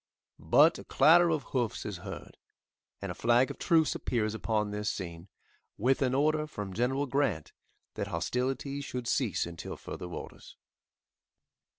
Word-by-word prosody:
But - - +5
a - - -9
clatter 170 +5 +5
of 155 -4 0
hoofs 120 -4 -2
is 105 -3 -4
heard, 95 +1 -9 0.7
and - - -3
a - - -4
flag 120 +2 +3
of - - -10
truce 160 -4 +3
appears 110 -3 -1
upon 110 -2 -1
this 105 0 -2
scene, 85 0 -6 0.5
with 130 +5 +2
an 130 -1 +2
order 155 +2 +2
from 105 -9 -6
General 130 +6 0
Grant 135 - -1 0.4
that 100 - -3
hostilities 130 - -2
should 125 -3 -5
cease 120 - +1
until 85 -1 -7
further 90 - -7
orders. 90 - -9
125 Hz, 150 wpm, -30 LUFS, 105-140 Hz, 0.7 s, But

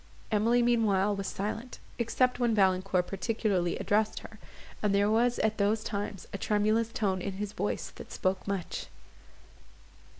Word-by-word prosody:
Emily 230 +3 +3
meanwhile 210 -4 +3
was 195 -1 -4
silent, 220 +6 -4 0.2
except 250 +2 +1
when 235 -2 +2
Valancourt 185 -2 +2
particularly 195 -3 0
addressed 205 +3 +1
her, - - -12 0.4
and 205 -2 +2
there 205 +1 +3
was 240 +2 +3
at 220 0 0
those 210 +2 +2
times 200 -2 -4
a 200 - -4
tremulous 215 +2 +1
tone 190 -5 0
in 195 +1 -3
his 205 +1 -4
voice - - -2
that - - -11
spoke 185 +1 -1
much. 195 -3 -3
210 Hz, 145 wpm, -30 LUFS, 195-225 Hz, 0.4 s, Emily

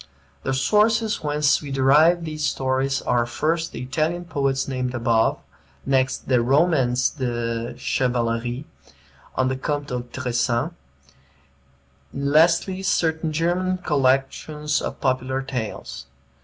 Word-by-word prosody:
The 130 - -1
sources 215 - +2
whence 150 0 +2
we 145 - -7
derive 150 +6 +4
these 155 -1 -5
stories 135 -1 0
are, 120 -1 +1
first, 160 +6 -1
the - - -6
Italian 155 +7 -1
poets 140 -4 -1
named 130 -1 -2
above; 115 -1 +2 0.5
next, 130 -1 0
the 125 -2 +3
"Romans 130 -2 +2
de 120 -3 -3
Chevalerie" 120 +1 -1 0.7
of 130 0 +1
the 130 - -1
Comte 145 +1 -3
de 125 0 -2
Tressan; 120 +2 -1 1.4
lastly, 165 +6 +2
certain 160 -4 0
German 175 +4 0
collections 145 0 0
of - - -5
popular 130 0 -1
tales. 105 - -5
135 Hz, 115 wpm, -23 LUFS, 125-155 Hz, 1.4 s, derive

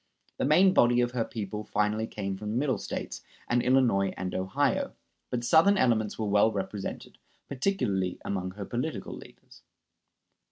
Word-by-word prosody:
The - - 0
main 180 +7 +5
body 120 -4 +4
of 120 0 0
her 125 -2 0
people 105 -2 -5
finally 105 +2 0
came 100 -3 -4
from 105 +2 -6
the 110 - -1
Middle 135 -1 0
States, - - -5 0.3
and 120 0 +2
Illinois 120 -7 +3
and 90 0 -4
Ohio; 95 +1 0 0.4
but 120 -1 -2
Southern 165 +10 +5
elements 110 - +1
were 110 - -2
well 105 +2 +3
represented, 100 -1 -5 0.3
particularly 125 - -1
among 95 -2 -2
her 100 -1 -6
political 125 +9 -4
leaders. - - -15
110 Hz, 155 wpm, -28 LUFS, 100-125 Hz, 0.4 s, main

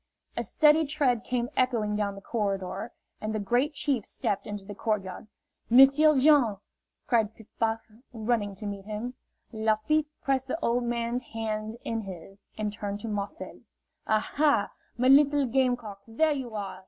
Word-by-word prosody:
A - - -1
steady 310 +1 +4
tread 270 -6 +1
came 245 -1 -1
echoing 230 -5 +1
down 205 -1 -1
the 200 - -10
corridor, 200 0 -3 0.3
and 215 0 -3
the - - 0
Great 245 +9 +1
Chief 275 -7 0
stepped 200 - -2
into 205 -2 -6
the 205 - -7
court 210 -1 -1
yard. 185 +2 -8 0.4
"M'sieu' 275 +4 +7
Jean!" 260 -7 +5 0.5
cried 225 -5 +1
Piff 225 - -15
Paff, 225 0 +1 0.3
running 220 -3 -1
to 210 - -7
meet 200 -1 -5
him. 215 +4 -5 0.4
Lafitte 220 +8 +1 0.2
pressed 265 -1 0
the 300 - -2
old 240 -4 0
man's 235 +1 -1
hands 220 -1 -4
in 225 -1 -2
his, 195 0 -10
and 210 -1 -2
turned 205 -1 -4
to 230 - -5
Marcel. 205 -1 -5 0.5
"Aha, 280 +7 +2 0.3
my 250 +1 +2
little 285 +1 +6
game 255 0 +2
cock, 210 -4 -9
there 305 +8 +2
you 255 -5 -5
are!" 200 -2 -5
225 Hz, 165 wpm, -28 LUFS, 210-260 Hz, 0.5 s, M'sieu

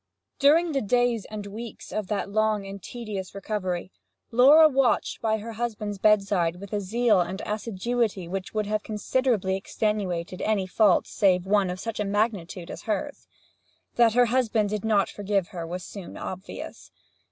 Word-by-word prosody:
During 320 +4 +5
the 275 -2 0
days 240 0 +1
and 210 -1 -7
weeks 220 +3 -8
of 215 -3 -3
that 205 -1 -2
long 215 -1 +1
and 195 0 -8
tedious 210 -6 -6
recovery, 185 -3 -3 0.4
Laura 280 +7 +8
watched 270 -4 +1
by 220 -1 +1
her 225 +2 -7
husband's 215 -3 -4
bedside 195 -5 +3
with 195 +2 -10
a 205 - 0
zeal 215 +1 +2
and 180 +2 -2
assiduity 215 -2 -2
which 190 +1 -4
would 215 -1 -1
have 215 +1 -1
considerably 215 -2 0
extenuated 190 -3 -2
any 210 -3 +1
fault 195 0 +3
save 185 -3 +2
one 200 -1 +2
of 180 +1 -4
such 225 0 -4
magnitude 200 -4 -2
as - - -8
hers. 280 +7 -3 0.7
That 235 -2 +4
her 245 0 +6
husband 230 -3 +1
did 210 -1 -3
not 210 -3 +3
forgive 200 -3 -1
her 170 -3 -6
was 180 +2 -5
soon 195 -2 -9
obvious. 190 +1 -7
210 Hz, 160 wpm, -26 LUFS, 190-230 Hz, 0.7 s, Laura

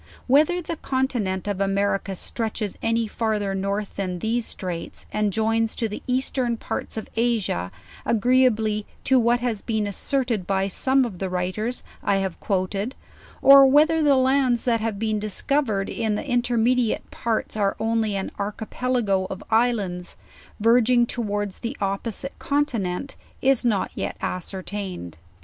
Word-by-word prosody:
Whether 310 +7 +3
the 330 0 -4
continent 240 -10 -1
of 200 -1 -2
America 195 0 0
stretches 215 0 -3
any 230 0 +1
father 210 -3 -1
north 200 +2 -2
than 185 -2 -2
these 225 +5 -1
straights, 175 -3 -5
and 210 -1 +1
joins 225 +2 +1
to 230 - -1
the 210 - -6
eastern 250 -2 0
parts - - -5
of 220 - -4
Asia 225 - 0 0.3
agree 250 +3 +3
ably 215 -2 -1 0.2
to 260 -1 +4
what 240 +1 +2
iias 230 -5 -2
been 220 -2 0
asserted 230 -1 -1
by 195 0 +1
some 265 +6 +3
of 195 -7 -7
the 190 - -2
writers 185 +7 -2 0.2
I 200 - +2
have 190 -2 -2
quoted, 195 +5 -1 0.5
or 275 0 +9
whether 310 +4 +5
the 290 -2 +5
lands 260 -2 +2
that 230 -3 +2
have 220 -2 -2
been 215 0 0
discovered 215 0 0
in 220 -2 -1
the 245 - -4
intermediate 245 -1 +1
parts 230 -2 -2
are 200 -2 +1
only 220 -2 0
an 195 - -3
archipelago 210 -1 -1
of 190 - -6
islands, 210 -6 0 0.4
verg 230 +2 +4
ing 240 -1 +5
towards 205 -4 -3
the 235 +4 -4
opposite 200 +6 -3
continent, 275 -6 -1 0.2
is 270 -2 +3
not 220 -5 +1
yet - - -4
ascertained. 185 - -5
220 Hz, 150 wpm, -24 LUFS, 195-245 Hz, 0.5 s, or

